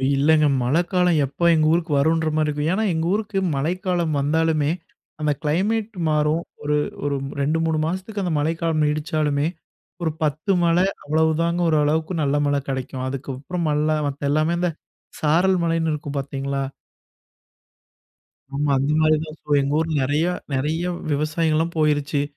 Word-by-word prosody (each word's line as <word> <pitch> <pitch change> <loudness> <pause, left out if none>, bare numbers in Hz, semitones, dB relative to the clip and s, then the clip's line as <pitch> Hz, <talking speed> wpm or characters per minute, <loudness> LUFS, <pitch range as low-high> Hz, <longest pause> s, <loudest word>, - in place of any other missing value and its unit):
இல்லைங்க 150 +2 +4 0.2
மழைக்காலம் 175 +5 +2
எப்போ 145 +6 -3
எங்கள் 155 -1 +3
ஊருக்கு 170 -1 0
வருன்ற 160 +3 +2
மாரி 155 -1 +2
இருக்கும். 150 +1 -1
ஏன்னா 220 - 0
எங்க 160 0 -1
ஊருக்கு 210 -1 -1 0.2
மழைக்காலம் 175 +2 -1
வந்தாலுமே 155 +1 +1 0.5
அந்த 150 -1 +2
கிளைமேட் 205 +8 0
மாறும். 155 +2 +1 0.2
ஒரு 150 0 +1 0.3
ஒரு 145 -1 0 0.3
2 150 +3 +1
3 160 -1 +1
மாசத்துக்கு 190 +5 -3
அந்த 175 - -1
மழைக்காலம் 160 0 0
நீடிச்சாலுமே 150 -1 0 0.6
ஒரு 160 - +1
10 155 +6 0
மழை 170 +2 +3 0.2
அவ்வளவு 160 +2 +2
தாங்க 170 +1 0
ஓரளவுக்கு 155 +2 +1
நல்ல 140 0 +1
மழை 145 0 +1
கெடைக்கும். 130 -1 -3
அதுக்கப்புறம் 140 +6 -4
மல்ல 150 +1 +1 0.2
மத்த 140 0 -3
எல்லாமே 155 +3 +2
இந்த 180 -1 +1 0.5
சாரல் 175 +5 +3
மழைன்னு 165 -1 +1
இருக்கும்னு 145 -1 -5
பார்த்தீங்களா? 140 0 -3 1.9
ஆமா. 145 +1 0
அந்த 140 +2 0
மாதிரி 155 0 +4
தான் 155 0 -10
ஸோ 150 - -20
எங்க 140 +1 -1
ஊர்ல 160 0 -1
நெறைய 145 +5 +1 0.3
நெறைய 150 +6 -1 0.3
விவசாயிங்கள்லாம் 155 +2 0
போயிருச்சு. 145 -2 +1
155 Hz, 140 wpm, -22 LUFS, 145-165 Hz, 1.9 s, இல்லைங்க